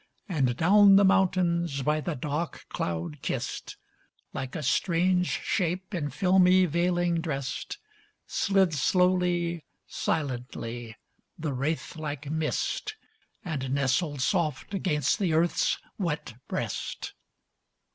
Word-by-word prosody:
And 135 - 0
down 200 +4 +7
the 200 0 +6
mountains 175 -6 +2
by 150 +3 +1
the 170 0 -3
dark 150 +4 -4
cloud 85 -2 -3
kissed, - - -4 0.6
Like 130 0 -5
a 155 - -3
strange 180 +5 +2
shape 185 +1 -1
in 150 -5 -2
filmy 185 +1 +4
veiling 175 0 +1
dressed, 140 -6 -4 0.5
Slid 195 -4 +2
slowly, 175 +2 +2 0.2
silently, 120 -4 -3 0.4
the 155 -3 -3
wraith 150 +5 -2
like 150 -2 -5
mist, 160 - -2 0.5
And 135 -5 -2
nestled 140 +1 0
soft 155 +2 0
against 150 -8 +1
the 180 -6 +1
earth's 165 +2 +2 0.2
wet 160 - -2
breast. - - -4
165 Hz, 105 wpm, -28 LUFS, 140-180 Hz, 0.6 s, down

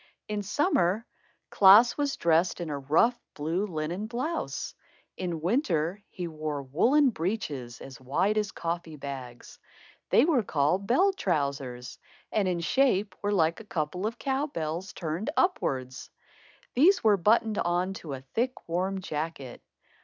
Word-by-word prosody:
In 210 -1 -2
summer 210 - +1 0.5
Klaas 205 +5 +7
was 285 -1 -1
dressed 170 +2 +2
in 170 -3 -4
a 145 - -3
rough, 160 - +2
blue 165 +7 -1
linen 175 +4 -3
blouse. 260 +9 -3 0.4
In 170 -3 -4
winter 180 - 0
he 180 -2 -5
wore 155 -3 -4
woollen 250 - +3
breeches 155 - -4
as 130 -1 -10
wide 165 +11 +1
as 210 -2 -2
coffee 170 -1 -4
bags. 135 -4 -8 0.5
They - - +5
were 305 -7 +3
called 180 +2 0
bell 375 +11 +4
trousers, 140 - -2 0.3
and 205 -3 +1
in 175 -2 -1
shape 210 -1 +2
were 205 - 0
like 165 -4 +2
a - - -9
couple 180 +1 -2
of 230 +2 -5
cow 275 +3 -1
bells 165 - -4
turned 170 - -4
upwards. 130 - -1 0.6
These 350 +10 +4
were 215 -2 +5
buttoned 215 +3 +2
on 175 +2 0
to 150 -4 -6
a 130 - -6
thick 235 - -3
warm 190 +3 -1
jacket. 150 -6 -5
180 Hz, 145 wpm, -28 LUFS, 155-220 Hz, 0.6 s, Klaas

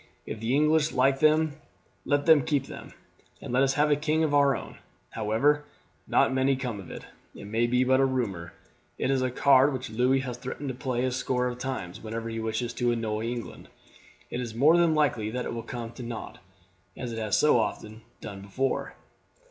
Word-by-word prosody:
If 110 - -6
the 115 +4 0
English 150 +1 +3
like 135 +1 +3
them 155 0 +3 0.5
let 145 -1 +1
them 160 -4 +6
keep 140 -2 0
them, - - -10 0.5
and - - -7
let 130 - +3
us 135 0 +2
have 150 0 +3
a - - +5
king 155 +2 0
of 150 -2 0
our 140 -2 +4
own. - - -8 0.3
However, 115 +7 +1 0.4
nought - - +3
may 135 +1 +2
come 125 -5 -4
of 95 - -10
it; - - -8 0.3
it - - -10
may 115 +3 0
be 125 +1 +2
but 130 +1 +3
a 135 - +4
rumour. 100 -10 -2 0.5
It 135 - 0
is 135 -1 +1
a 130 - +1
card 135 +2 +4
which 130 -3 -5
Louis 125 +4 +2
has 125 -3 -5
threatened 135 +2 -6
to - - -3
play 125 -1 -2
a 130 - 0
score 125 0 -1
of 125 0 -3
times, 125 -9 -5
whenever 115 +1 -5
he 115 0 -4
wishes 110 +2 -2
to 120 -1 0
annoy 110 -2 -2
England. 120 0 -6 0.6
It 125 - -3
is 115 -3 -6
more 145 +8 +5
than 170 -2 +3
likely 125 -8 +1
that 125 +3 -3
it - - -4
will 115 - -4
come 115 0 -6
to 120 - -10
nought, 115 -2 -7 0.6
as 120 -2 -5
it 115 - -4
has 110 -1 +1
so 150 -5 +4
often 110 0 -4 0.2
done 100 -2 -8
before." 130 +7 -2
125 Hz, 210 wpm, -27 LUFS, 115-140 Hz, 0.6 s, them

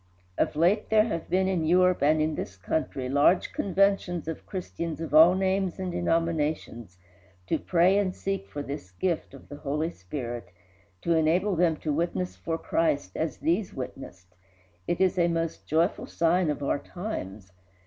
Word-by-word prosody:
Of - - 0
late 180 +7 +2
there 215 -1 +5
have 170 -8 -4
been 185 +2 +2
in 185 -4 0
Europe 180 +2 +3
and 155 +2 +4
in 155 +1 +1
this 100 -9 -5
country 130 +5 -2
large 145 +7 +3
conventions 195 -3 +1
of 165 - -6
Christians 170 -4 -5
of 165 -2 -5
all 165 +4 +8
names 190 -1 0
and 185 -1 -3
denominations 160 - -1 0.5
to - - 0
pray 185 +3 +3
and 185 -2 -1
seek 195 0 -3
for 145 - -6
this 140 -9 -6
gift 155 - -2
of 135 - -14
the 145 - -9
Holy 150 +3 -2
Spirit, 120 - -6 0.5
to 170 - +2
enable 175 +5 +2
them 170 -1 +3
to 150 - -1
witness 95 - -2
for 160 - -3
Christ 150 - 0
as 160 - -2
these 180 +5 -1
witnessed; 95 -9 -8 0.5
it 175 - 0
is 185 -1 +2
a 170 - +4
most 165 -1 -2
joyful 165 +4 +1
sign 170 0 +2
of 145 -1 -2
our 140 - 0
times. 105 - -6
165 Hz, 170 wpm, -27 LUFS, 145-180 Hz, 0.5 s, all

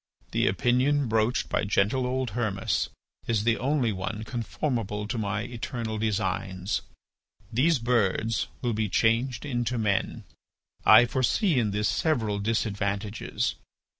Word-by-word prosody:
"The - - +2
opinion 125 +8 +2
broached 110 +2 +1
by - - 0
gentle 105 +5 +1
old 130 -2 -1
Hermas 105 -4 -1 0.4
is 110 -3 +1
the 115 0 +2
only 130 -3 +1
one 100 +4 -4
conformable 115 -2 -3
to 105 - -3
my 105 0 -1
eternal 115 -2 -4
designs. 95 -2 -1 0.7
These 150 +7 +3
birds 115 -2 +1 0.2
will 120 -2 +1
be 110 -1 -1
changed 115 +4 +1
into 120 -3 -1
men. 105 -3 0 0.6
I 110 +3 +9
foresee 130 - +2
in 110 -3 +1
this 105 +1 0
several 110 -10 0
disadvantages. 100 -1 -1
110 Hz, 125 wpm, -27 LUFS, 105-125 Hz, 0.7 s, I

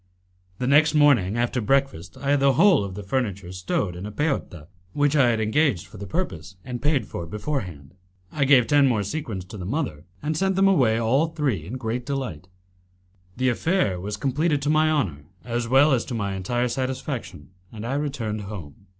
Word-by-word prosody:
The 125 - -2
next 150 +3 +4
morning, 120 -9 +4
after 120 +1 0
breakfast, 125 -7 0
I 140 0 -1
had 145 - +3
the 135 0 +4
whole 180 - +5
of 95 -2 -6
the 105 - -6
furniture 100 -5 -2
stowed 90 0 -2
in 90 +4 -6
a - - -7
peotta, 105 - -2 0.3
which 145 0 +2
I 135 -5 +5
had 115 -1 +1
engaged 110 - +1
for - - -13
the 100 +1 -7
purpose 95 - -4
and 125 -2 -5
paid 145 -5 +1
for 85 - -6
beforehand. 90 - -5 0.4
I 145 -2 0
gave 130 -3 +6
ten 145 0 +4
more 110 -5 +1
sequins 100 - -4
to 100 +3 -10
the 90 - -6
mother, 120 - -3 0.2
and 155 +1 -1
sent 190 +3 +1
them 195 +1 +4
away 130 -13 +3
all 125 +8 +2
three 135 - -2
in 110 - -7
great 125 -1 -3
delight. 125 - -4 0.9
The 130 0 +2
affair 120 - 0
was 100 +3 -4
completed 145 +6 0
to 145 - +1
my 155 0 +3
honour 95 - -1 0.2
as 120 -1 -2
well 135 +5 +5
as 120 - +1
to 120 - -5
my 100 -3 -2
entire 120 +6 -1
satisfaction, 130 - -4 0.2
and 110 0 -7
I 125 - -2
returned 130 -7 -2
home. 100 -3 -9
120 Hz, 195 wpm, -24 LUFS, 100-145 Hz, 0.9 s, gave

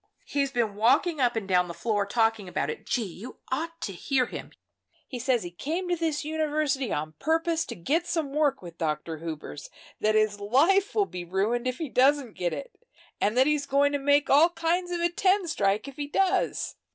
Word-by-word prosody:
He's 280 -1 -1
been 235 -5 0
walking 260 - +2
up 245 -1 +2
and 220 -4 -3
down 180 -2 +3
the 170 - -7
floor 205 +2 -1
talking 225 -3 +1
about 145 -4 -1
it. - - -10
Gee! 240 - 0
you 205 +5 -9
ought 330 +5 -3
to 195 - -3
hear 255 +8 0
him. - - -8 0.6
He 250 - -6
says 245 -1 +1
he 175 - -6
came 320 - -3
to 350 - +2
this 315 -3 -2
university 300 -5 0
on 155 +1 -3
purpose 325 +1 0
to - - -6
get 310 - 0
some 305 -5 -2
work 290 -6 +1
with 170 -1 -11
Dr. 160 0 -2
Hubers, 155 - -7 0.3
that 215 0 +2
his 215 -1 +2
life 315 - +3
will 415 -2 +3
be 180 - -7
ruined 205 +8 0
if 255 0 -2
he 320 - -3
doesn't 265 -2 +3
get 175 -1 -2
it, - - -7 0.4
and 210 +4 +1
that 260 - +6
he's 295 -1 +1
going 280 +1 +3
to 285 - -1
make 285 +1 +3
all 300 +5 +6
kinds 345 +1 -1
of 350 -1 -2
a 345 - +3
ten 375 +2 +2
strike, 205 -5 0
if 275 - -10
he 290 -1 -3
does. 380 +6 0
265 Hz, 210 wpm, -27 LUFS, 205-315 Hz, 0.6 s, that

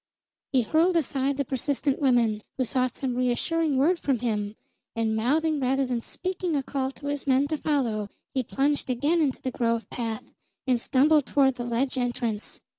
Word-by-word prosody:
He 255 -3 +3
hurled 330 +9 +3
aside 275 -2 0
the 280 - 0
persistent 275 +2 -1
women, 235 -6 +3 0.2
who 260 - +1
sought 255 0 0
some 260 -2 -2
reassuring 265 +5 +1
word 335 +6 +3
from 275 -3 +1
him, 215 -3 -2 0.4
and 225 -1 0
mouthing 300 +7 +1
rather 270 +1 +1
than 245 -2 -2
speaking 365 +2 -3
a 275 - 0
call 265 -1 -2
to 285 - -12
his 285 0 -3
men 265 +1 +4
to 310 - -1
follow, 235 -9 0 0.3
he 265 - +1
plunged 275 +3 0
again 290 +7 +2
into 275 -4 0
the 260 - -1
grove 230 -1 0
path 235 +1 -4 0.3
and 250 -3 +2
stumbled 290 +2 +3
toward 270 -2 +3
the 245 -1 -5
ledge 255 +3 0
entrance. 240 -3 -2
265 Hz, 180 wpm, -26 LUFS, 240-285 Hz, 0.4 s, men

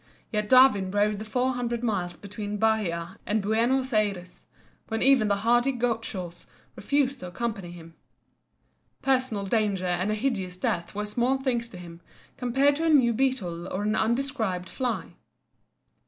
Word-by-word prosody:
Yet 210 -1 -1
Darwin 255 -7 +6
rode 205 +1 +1
the 215 - -6
four 250 +4 0
hundred 240 -1 -3
miles 180 -6 -1
between 205 +1 -6
Bahia 195 -5 0
and 215 +1 0
Buenos 235 +5 +1
Ayres, 200 -4 -1 0.4
when 225 -1 -1
even 265 -5 +5
the 200 - +2
hardy 240 +3 +4
Gauchos 225 -8 -3 0.3
refused 280 -2 0
to 180 - -7
accompany 200 -1 -4
him. 165 -1 -12 1.1
Personal 255 -6 +1
danger 200 -3 0
and 180 +2 0
a 215 - +1
hideous 205 -7 -2
death 170 0 -2
were 210 0 -2
small 240 +5 +1
things 250 -3 -1
to 180 - -11
him 170 -1 -11 0.3
compared 270 +3 +2
to 325 - -1
a - - +3
new 255 -6 +5
beetle 200 -9 -1
or 195 +2 -3
an 215 +1 +1
undescribed 220 -6 -1
fly. 250 -3 -3
220 Hz, 155 wpm, -27 LUFS, 190-250 Hz, 1.1 s, Darwin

